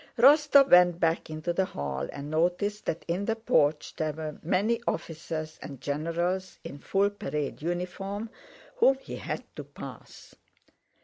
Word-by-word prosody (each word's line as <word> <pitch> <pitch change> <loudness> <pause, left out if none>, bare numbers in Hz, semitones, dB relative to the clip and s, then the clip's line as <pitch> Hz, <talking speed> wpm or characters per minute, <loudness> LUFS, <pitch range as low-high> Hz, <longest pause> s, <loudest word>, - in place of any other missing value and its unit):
Rostóv 280 +2 +6
went 175 -1 +7
back 165 -2 +1
into 155 +2 -3
the 190 - +2
hall 70 - -4
and 145 +1 -7
noticed 180 +6 0
that 160 - -2
in 180 +4 -1
the 225 - 0
porch 160 -10 +1
there 155 -1 -1
were 155 -1 -6
many 215 +8 +1
officers 160 -1 -4
and 140 -3 -8
generals 170 +6 -2
in 145 - -8
full 200 +6 +1
parade 150 -8 -4
uniform, 195 +6 -3 0.5
whom 270 - +5
he 270 - -8
had - - -4
to - - -6
pass. - - -11
175 Hz, 145 wpm, -28 LUFS, 155-200 Hz, 0.5 s, went